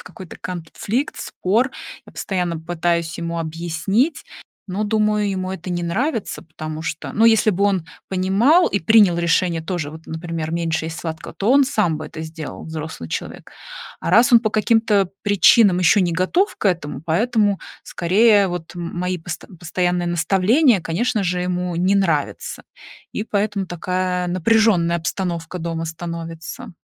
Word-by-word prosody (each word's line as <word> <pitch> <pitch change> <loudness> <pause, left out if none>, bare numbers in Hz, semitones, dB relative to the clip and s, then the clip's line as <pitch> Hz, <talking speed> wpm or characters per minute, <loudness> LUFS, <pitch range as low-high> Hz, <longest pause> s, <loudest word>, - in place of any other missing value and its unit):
в - - -11
какой-то 190 -6 -11
конфликт, 185 - -3
спор. 225 +8 0 0.4
Я - - -15
постоянно 180 -4 -2
пытаюсь 170 0 -1
ему 170 0 -3
объяснить, 170 - -1 0.5
но, 200 +4 -1
думаю, 210 -1 +1
ему 185 -1 -3
это 185 -1 -6
не 175 0 -2
нравится, 225 - -2
потому 155 0 -7
что, 160 0 -5
ну, 220 - +3
если 220 -2 +5
бы 200 -1 +2
он 190 -5 +1 0.2
понимал 200 - +4
и 200 - 0
принял 205 -1 +5
решение 170 0 +1
тоже, 165 -4 -3
вот, 160 +1 -11
например, 160 -1 -4
меньше 165 -1 -1
есть 165 0 -6
сладкого, 160 -1 -6
то 205 +4 0
он 275 +1 +6
сам 210 - +1
бы 155 - -6
это - - -8
сделал- 160 -1 -7
взрослый 155 - -6
человек. - - -6 0.5
А - - -2
раз 235 +2 +5
он 235 -2 +7
по 215 -2 -1
каким-то 215 -2 +2
причинам 205 -1 +5
ещё 180 +3 +4
не 175 -2 +1
готов 185 - +1
к - - 0
этому, 155 -7 -2
поэтому, 205 +4 +1 0.2
скорее, 200 +3 +3
вот 175 -1 -6
мои 180 +1 -3
пост 170 -1 -7
постоянные 175 0 -1
наставления, 195 - +3
конечно 210 +6 0
же, 180 -1 -1
ему 180 0 -2
не 185 +3 +2
нравятся. 170 -7 -1 0.5
И 210 - -3
поэтому 205 -2 -1
такая 180 +1 -2
напряженная 185 -1 +3
обстановка 170 0 -3
дома 165 -1 -3
становится. 165 +5 -7
180 Hz, 155 wpm, -21 LUFS, 165-205 Hz, 0.5 s, он